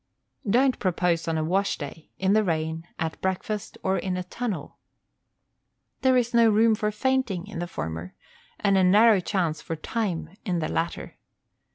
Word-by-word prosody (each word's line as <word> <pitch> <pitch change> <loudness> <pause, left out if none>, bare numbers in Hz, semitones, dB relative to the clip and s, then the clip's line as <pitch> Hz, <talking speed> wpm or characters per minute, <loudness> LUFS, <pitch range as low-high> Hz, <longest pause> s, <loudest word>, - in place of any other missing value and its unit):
Don't 255 +4 +3
propose 175 -3 0
on 165 -1 0
a 155 - 0
wash 190 +5 +1
day, 155 +1 -8
in 190 +1 +2
the 215 0 +4
rain, 160 -2 -2
at 160 0 -3
breakfast, 190 +2 -3
or 190 0 +1
in 185 -1 -2
a 180 - -2
tunnel. 190 -5 -5 1.2
There 260 -1 +4
is 240 -1 0
no 230 -1 +6
room 220 +1 +4
for 210 0 0
fainting 220 -5 0
in 205 -5 -7
the 175 - -3
former, 80 - -5 0.4
and 200 -2 +3
a - - +4
narrow 210 +3 +6
chance 175 -4 -1
for 165 - -4
time 180 -1 -3
in 180 -4 -1
the 155 -2 -1
latter. 165 +1 -3
190 Hz, 170 wpm, -26 LUFS, 165-215 Hz, 1.2 s, no